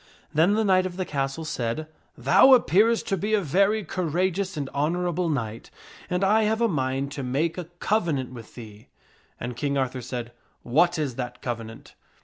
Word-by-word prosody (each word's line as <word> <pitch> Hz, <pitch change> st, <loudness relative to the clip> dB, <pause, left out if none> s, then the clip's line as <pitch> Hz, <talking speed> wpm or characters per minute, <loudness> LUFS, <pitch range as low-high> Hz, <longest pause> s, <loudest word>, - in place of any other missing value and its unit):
Then 170 Hz, +7 st, +4 dB
the 220 Hz, -, +2 dB
knight 185 Hz, -1 st, +3 dB
of 180 Hz, -1 st, -9 dB
the 185 Hz, -, -1 dB
castle 140 Hz, +2 st, -3 dB
said, 125 Hz, 0 st, -2 dB, 0.2 s
" -, -, -39 dB
Thou 260 Hz, -, +8 dB
appearest 225 Hz, 0 st, +3 dB
to 195 Hz, -, +1 dB
be 210 Hz, +5 st, +1 dB
a -, -, +2 dB
very 195 Hz, +6 st, +2 dB
cour 180 Hz, -3 st, -2 dB
ageous 185 Hz, +2 st, -1 dB
and 140 Hz, -2 st, -2 dB
honorable 175 Hz, +3 st, 0 dB
knight, 115 Hz, -7 st, -3 dB, 0.4 s
and 180 Hz, +1 st, 0 dB
I 210 Hz, +3 st, +4 dB
have 220 Hz, +1 st, +1 dB
a 235 Hz, -, +3 dB
mind 135 Hz, -5 st, -1 dB
to 140 Hz, -, -5 dB
make 145 Hz, +6 st, -1 dB
a 180 Hz, -, -5 dB
covenant 155 Hz, -, 0 dB
with 115 Hz, -3 st, -11 dB
thee." 110 Hz, -3 st, -11 dB, 0.5 s
And 120 Hz, 0 st, -5 dB
King 140 Hz, +3 st, -1 dB
Arthur 130 Hz, -1 st, -1 dB
said, 120 Hz, -1 st, -5 dB, 0.2 s
" -, -, -42 dB
What 175 Hz, +4 st, +4 dB
is 140 Hz, -6 st, -2 dB
that 125 Hz, -1 st, -5 dB
covenant 115 Hz, -2 st, -6 dB
155 Hz, 190 wpm, -25 LUFS, 130-185 Hz, 0.5 s, Thou